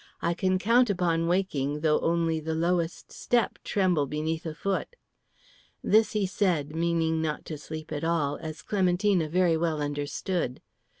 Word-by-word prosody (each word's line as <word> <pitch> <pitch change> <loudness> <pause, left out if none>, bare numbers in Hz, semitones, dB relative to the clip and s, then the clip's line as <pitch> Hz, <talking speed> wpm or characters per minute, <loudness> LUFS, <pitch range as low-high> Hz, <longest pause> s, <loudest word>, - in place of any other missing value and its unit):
I 170 - 0
can 185 +1 +1
count 230 +6 +3
upon 170 -3 +1
waking, 150 -6 0
though 150 -1 +3
only 165 -1 +1
the 160 +1 -3
lowest 170 0 -1
step 240 -1 0
tremble 180 -8 +1
beneath 160 +3 -3
a 155 - -5
foot." 195 - -2 0.9
This 220 0 +3
he 210 -2 +1
said, 175 -6 0
meaning 165 -1 +1
not 155 -2 -3
to 155 - -5
sleep 155 +1 -8
at 150 0 -3
all, 160 -4 0
as 160 -1 -7
Clementina 185 -3 +1
very 175 0 +3
well 160 -1 0
understood. 145 +1 -2
165 Hz, 155 wpm, -27 LUFS, 155-185 Hz, 0.9 s, count